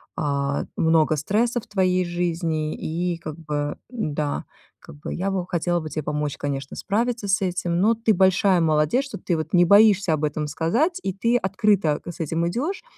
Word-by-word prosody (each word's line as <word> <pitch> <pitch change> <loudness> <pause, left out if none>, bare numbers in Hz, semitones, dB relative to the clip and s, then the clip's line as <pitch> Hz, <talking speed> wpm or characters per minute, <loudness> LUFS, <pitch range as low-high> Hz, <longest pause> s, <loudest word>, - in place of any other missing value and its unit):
а, 140 -1 -1
много 160 -1 +3
стресса 230 - 0
в - - -14
твоей 185 -2 +1
жизни, 170 -3 -2
и 170 +2 -2
как 155 -2 -8
бы 150 -2 -3
да, 150 - -3 0.3
как - - -13
бы 150 - -7
я 195 +2 -2
бы 185 -2 -2
хотела 175 0 0
бы 155 - -6
тебе 155 +1 -4
помочь, 150 -1 -2
конечно, 140 -1 -4
справиться 230 +1 -1
с 200 +1 +2
этим. 175 -2 -1
Но 225 +3 +4
ты 225 -1 +2
большая 190 0 +3
молодец, 155 - +2
что 270 - -7
ты 175 -1 -1
вот 155 0 -4
не 175 -1 +6
боишься 200 -2 +5
об 155 0 -2
этом 150 0 -1
сказать, 240 - 0
и - - -1
ты 230 +5 +1
открыто 190 -7 +1
к 175 - -6
с 170 - -14
этим 165 +2 -1
идёшь. 290 - -3
175 Hz, 190 wpm, -23 LUFS, 155-200 Hz, 0.3 s, не